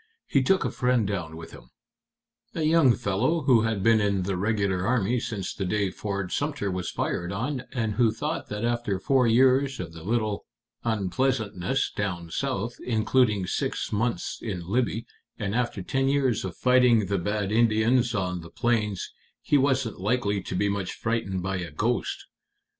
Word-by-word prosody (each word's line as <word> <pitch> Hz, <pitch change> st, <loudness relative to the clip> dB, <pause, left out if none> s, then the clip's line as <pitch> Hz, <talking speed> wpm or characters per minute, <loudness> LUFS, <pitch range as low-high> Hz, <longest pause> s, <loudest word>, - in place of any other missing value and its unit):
He 140 Hz, -, +2 dB
took 185 Hz, +8 st, +2 dB
a -, -, -1 dB
friend 125 Hz, -3 st, +1 dB
down 90 Hz, -6 st, -3 dB
with 80 Hz, -, -9 dB
him -, -, -14 dB, 0.9 s
a 160 Hz, -, -1 dB
young 155 Hz, -6 st, +5 dB
fellow 125 Hz, -, 0 dB
who 130 Hz, -5 st, +4 dB
had 110 Hz, -3 st, -1 dB
been 115 Hz, 0 st, +5 dB
in 100 Hz, -2 st, +1 dB
the 95 Hz, +1 st, -1 dB
regular 100 Hz, -1 st, 0 dB
army 115 Hz, +1 st, +1 dB
since 110 Hz, -5 st, -4 dB
the 95 Hz, -, -4 dB
day 100 Hz, 0 st, 0 dB
Fort 100 Hz, -3 st, -4 dB
Sumter 145 Hz, -9 st, -1 dB
was 90 Hz, -1 st, -3 dB
fired 85 Hz, +1 st, -2 dB
on, 125 Hz, +6 st, -3 dB
and 115 Hz, -5 st, -1 dB
who 115 Hz, 0 st, +3 dB
thought 150 Hz, +8 st, -4 dB
that 105 Hz, +2 st, -3 dB
after 120 Hz, -4 st, 0 dB
four 130 Hz, +5 st, +2 dB
years 130 Hz, +3 st, +4 dB
of 85 Hz, -3 st, -6 dB
the 80 Hz, -, -10 dB
little 110 Hz, +2 st, -1 dB, 0.4 s
unpleasantness 110 Hz, +1 st, 0 dB
down 85 Hz, -5 st, -3 dB
South, 120 Hz, -1 st, -2 dB
including 110 Hz, -3 st, +2 dB
six -, -, -2 dB
months 115 Hz, +3 st, -1 dB
in 95 Hz, -6 st, -4 dB
Libby, 115 Hz, +2 st, 0 dB, 0.3 s
and 100 Hz, -2 st, -3 dB
after 120 Hz, -5 st, -1 dB
ten 135 Hz, +7 st, 0 dB
years 135 Hz, -5 st, +1 dB
of 95 Hz, -3 st, -5 dB
fighting 125 Hz, -4 st, +4 dB
the 100 Hz, 0 st, -1 dB
bad 105 Hz, +2 st, -1 dB
Indians 115 Hz, +2 st, +3 dB
on 90 Hz, -3 st, -1 dB
the 85 Hz, -, -11 dB
plains, 110 Hz, -2 st, -1 dB, 0.3 s
he -, -, +2 dB
wasn't 135 Hz, -7 st, +1 dB
likely 105 Hz, -2 st, 0 dB
to 95 Hz, -, -5 dB
be 100 Hz, +3 st, +1 dB
much 100 Hz, -2 st, -2 dB
frightened 100 Hz, -5 st, -2 dB
by 95 Hz, 0 st, -1 dB
a 85 Hz, -2 st, -4 dB
ghost. 110 Hz, +11 st, -1 dB
110 Hz, 170 wpm, -26 LUFS, 95-125 Hz, 0.9 s, young